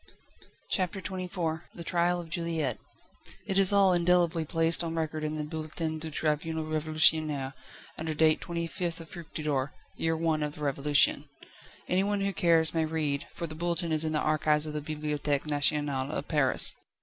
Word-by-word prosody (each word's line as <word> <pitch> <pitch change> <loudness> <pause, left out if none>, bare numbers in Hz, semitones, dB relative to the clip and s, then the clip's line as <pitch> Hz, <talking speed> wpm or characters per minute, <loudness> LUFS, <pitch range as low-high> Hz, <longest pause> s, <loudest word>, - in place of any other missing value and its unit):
CHAPTER 185 0 0
XXIV 180 -4 -3
The 170 - -7
trial 175 +1 +1
of 165 -2 -9
Juliette. 165 - -1 0.7
It 195 0 +1
is 195 0 +6
all 200 -2 +5
indelibly 175 -1 +2
placed 165 +2 +4
on 165 -1 -3
record 155 -1 -2
in 155 0 -2
the 155 - -3
"Bulletin 155 +1 -4
du 160 +1 -5
Tribunal 155 +1 -1
Révolutionnaire," 155 -2 +1 0.5
under 160 0 -3
date 155 0 +3
25th 170 0 -3
Fructidor, 150 -5 -3 0.2
year 165 0 0
I. 160 -1 +1
of 150 -1 -3
the 150 - -8
Revolution. 145 +1 +2 0.6
Anyone 200 +2 +1
who 195 0 0
cares 165 -3 +3
may 165 -1 +1
read, 155 -3 -2
for 170 - -5
the 155 - -7
Bulletin 170 +1 -1
is 155 0 +3
in 155 0 -1
the 150 - +1
Archives 150 0 +2
of 155 - -5
the 150 - -3
Bibliothèque 150 -1 -2
Nationale 145 -2 +1
of - - -4
Paris. 145 -5 +2
160 Hz, 160 wpm, -29 LUFS, 150-170 Hz, 0.7 s, is